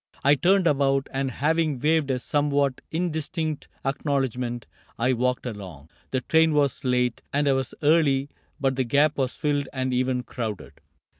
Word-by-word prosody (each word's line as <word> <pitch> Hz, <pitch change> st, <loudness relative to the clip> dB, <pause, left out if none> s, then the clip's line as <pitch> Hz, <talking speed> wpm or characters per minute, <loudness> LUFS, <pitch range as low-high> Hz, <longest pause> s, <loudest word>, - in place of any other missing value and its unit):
I 140 Hz, -, +6 dB
turned 185 Hz, +5 st, +3 dB
about 135 Hz, -3 st, +2 dB
And 135 Hz, 0 st, -1 dB
having 155 Hz, +2 st, 0 dB
waved 150 Hz, +2 st, +1 dB
a 130 Hz, -, +1 dB
somewhat 140 Hz, 0 st, 0 dB
indistinct 160 Hz, -2 st, -2 dB, 0.2 s
Acknowledgment, 130 Hz, -4 st, -1 dB, 0.3 s
I 125 Hz, +3 st, +2 dB
walked 125 Hz, +1 st, 0 dB
along. 95 Hz, -, -8 dB, 0.2 s
The 130 Hz, -, -1 dB
train 160 Hz, +2 st, +3 dB
Was 145 Hz, -2 st, +1 dB
late 125 Hz, -2 st, +1 dB
and 145 Hz, 0 st, +1 dB
I 140 Hz, -, +4 dB
was 135 Hz, -1 st, -2 dB
early, 145 Hz, -3 st, +3 dB, 0.3 s
but 135 Hz, -2 st, 0 dB
the 130 Hz, -, +2 dB
gap 145 Hz, +5 st, +2 dB
Was 130 Hz, -2 st, 0 dB
filled 145 Hz, -2 st, -1 dB
and 130 Hz, -1 st, -2 dB
even 125 Hz, 0 st, 0 dB
crowded. 110 Hz, -6 st, -6 dB
135 Hz, 155 wpm, -25 LUFS, 125-150 Hz, 0.3 s, I